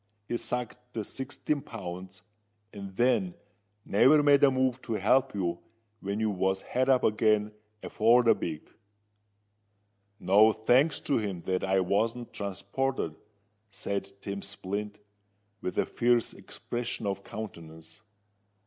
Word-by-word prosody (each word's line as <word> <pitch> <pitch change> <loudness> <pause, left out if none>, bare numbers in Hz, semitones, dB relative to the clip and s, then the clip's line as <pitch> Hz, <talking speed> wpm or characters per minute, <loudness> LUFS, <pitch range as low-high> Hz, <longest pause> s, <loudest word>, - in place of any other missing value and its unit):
"He - - -2
sacked 125 0 -4
the 110 - -3
sixteen 140 +5 -3
pounds, 95 -4 -8 0.5
and 100 -2 -8
then 150 - +2 0.5
never 135 +9 +5
made 145 -1 +5
a 140 - +8
move 130 -1 0
to 115 - -4
help 125 +5 +2
you 85 -3 -1 0.4
when 100 +2 -3
you 110 -1 +1
was 95 0 0
had 130 +2 -1
up 130 -2 +4
again 105 -1 +2 0.3
afore 115 +3 +4
the 115 - +6
beak." 80 -2 -6 1.5
"No 105 +3 +5
thanks 125 +8 +3
to - - 0
him 100 -5 -4
that 95 0 -1
I 95 0 +2
wasn't 115 +6 -1
transported," 100 -1 -3 0.5
said 100 -1 -4
Tim 100 0 -5
Splint, 100 +2 -5 0.6
with 90 - -4
a - - +2
fierce 120 -1 +1
expression 120 -2 -5
of 100 -1 -2
countenance. 85 -3 -9
105 Hz, 130 wpm, -29 LUFS, 95-125 Hz, 1.5 s, a